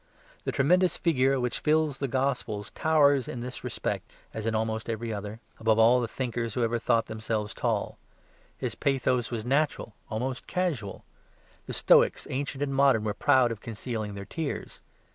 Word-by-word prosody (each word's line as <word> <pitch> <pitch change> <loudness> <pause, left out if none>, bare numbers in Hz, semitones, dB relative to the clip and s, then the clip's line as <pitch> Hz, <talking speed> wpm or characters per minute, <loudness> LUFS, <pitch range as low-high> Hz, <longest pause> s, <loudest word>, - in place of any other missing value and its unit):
The - - 0
tremendous 180 +6 +3
figure 135 -5 +2
which 125 -1 -1
fills 155 -2 +1
the 140 - -1
Gospels 125 -6 -2
towers 145 -4 +3
in 120 - -5
this 125 -1 -6
respect, - - -3 0.2
as 110 0 -4
in 110 - 0
every 110 +1 -2
other, 105 +2 -6 0.2
above 110 -1 +3
all 120 +3 +6
the 120 - -1
thinkers 120 -2 -3
who 125 - +1
ever 115 +1 +1
thought 115 0 +2
themselves 110 0 -3
tall. 115 -4 -2 0.6
His - - -3
pathos 130 -3 0
was 115 -2 -4
natural, 140 -3 0 0.2
almost 125 +4 -3
casual. 155 - -2 0.6
The - - -5
Stoics, - - +4
ancient 140 +1 -2
and 140 -1 -2
modern, 135 -5 +4
were 105 -1 -1
proud 130 -1 +3
of 110 -2 -6
concealing 110 -2 -4
their 100 0 -6
tears. 150 - -5
120 Hz, 160 wpm, -28 LUFS, 110-135 Hz, 0.6 s, all